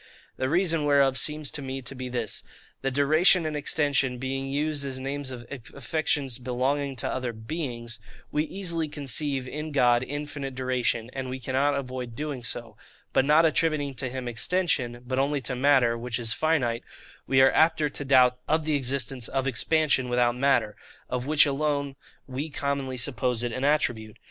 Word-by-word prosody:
The 130 0 -1
reason 165 -1 +2
whereof 140 -2 +4
seems 150 +3 +1
to 145 - -4
me 135 0 -5
to 120 - -4
be 130 -1 -6
this,—That 125 +2 -5
duration 155 +5 +5
and 155 -1 -2
extension 140 -3 +1
being 135 +1 -3
used 145 +1 -1
as 135 -2 -4
names 135 +1 -4
of 120 -2 -8 0.3
affections 140 -3 -1
belonging 135 +3 -1
to 120 - -2
other 125 -2 -2
beings, 120 -2 -5 0.3
we 150 - +1
easily 170 -3 -2
conceive 140 -2 -1
in 150 +4 -5
God 120 -4 +4
infinite 145 0 -5
duration, 125 -2 -1
and 130 -1 -4
we 130 +1 -4
cannot 135 +3 +1
avoid 125 -3 -5
doing 145 -3 -4
so: 115 -1 -6 0.4
but, 130 - +4
not 155 +3 +5
attributing 155 -3 +1
to 130 0 -3
him 130 0 -5
extension, 120 -2 0
but 130 +1 -1
only 140 +1 +1
to 130 0 -4
matter, 130 -3 +4
which 115 0 -3
is 115 -2 0
finite, 135 -8 +1 0.4
we 130 - +3
are 130 0 +7
apter 160 -1 +3
to 145 0 -4
doubt 125 -2 +5
of 155 0 +1
the 155 - +1
existence 135 -2 -1
of 135 0 -1
expansion 135 0 +1
without 120 -1 +2
matter; 125 -5 +2 0.3
of 125 +1 -3
which 150 0 +6
alone 140 -1 -1 0.3
we 135 +4 -4
commonly 140 -2 -2
suppose 125 -1 0
it 120 -2 -2
an 130 - -3
attribute. 120 -7 0
135 Hz, 170 wpm, -27 LUFS, 125-145 Hz, 0.4 s, are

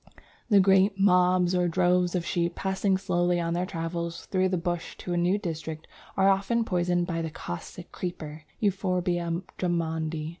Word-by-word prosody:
The 205 -3 +6
great 195 +1 +4
"mobs" 180 -2 +4
or 180 -1 +2
droves 180 +1 +2
of 175 -2 -1
sheep 170 0 -1
passing 190 0 0
slowly 175 -2 +1
on 170 0 -1
their 180 +1 -1
travels 170 -1 -4
through 185 -1 +1
the 185 - 0
bush 175 0 -3
to 180 - -4
a - - 0
new 175 +3 +2
district 160 -5 -5 0.3
are 195 0 +4
often 200 +4 +2
poisoned 175 -2 +1
by 165 -2 -2
the 160 - -3
Caustic 155 - -8
Creeper 155 -4 -6
(Euphorbia 180 -4 0 0.2
Drummondi). 160 -3 -1
175 Hz, 160 wpm, -27 LUFS, 170-185 Hz, 0.3 s, The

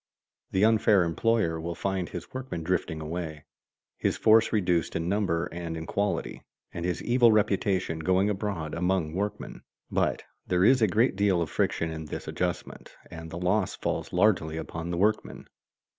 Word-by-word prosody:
The 95 +2 +3
unfair 110 -3 +4
employer 85 -1 +1
will 85 +1 -4
find 95 0 -2
his 90 -1 -8
workmen 130 -10 -5
drifting 80 -2 -1
away, 80 -1 -5 0.5
his - - 0
force 110 +1 +5
reduced 90 -8 +1
in 80 +1 -1
number 90 -4 0
and 80 -1 -5
quality, 100 0 -2 0.3
and 85 - -5
his 90 -1 -2
evil 120 -1 +5
reputation 100 -5 +1
going 95 +4 +2
abroad 100 -6 -3
among 90 -2 0
workmen. 100 +3 -4 0.3
But - - 0 0.2
there 90 +1 +3
is 130 +2 +5
a 110 - +5
great 110 +5 +2
deal 100 -2 +2
of 80 -5 -2
friction 80 +4 0
in 80 0 -6
this 75 - -7
adjustment 90 -1 -4 0.2
and 80 -1 -8
the 80 - -6
loss 90 +2 0
falls - - -3
largely 90 -5 +2
upon 80 +1 -5
the 85 - -2
workman. 105 +4 0
90 Hz, 160 wpm, -27 LUFS, 80-105 Hz, 0.5 s, force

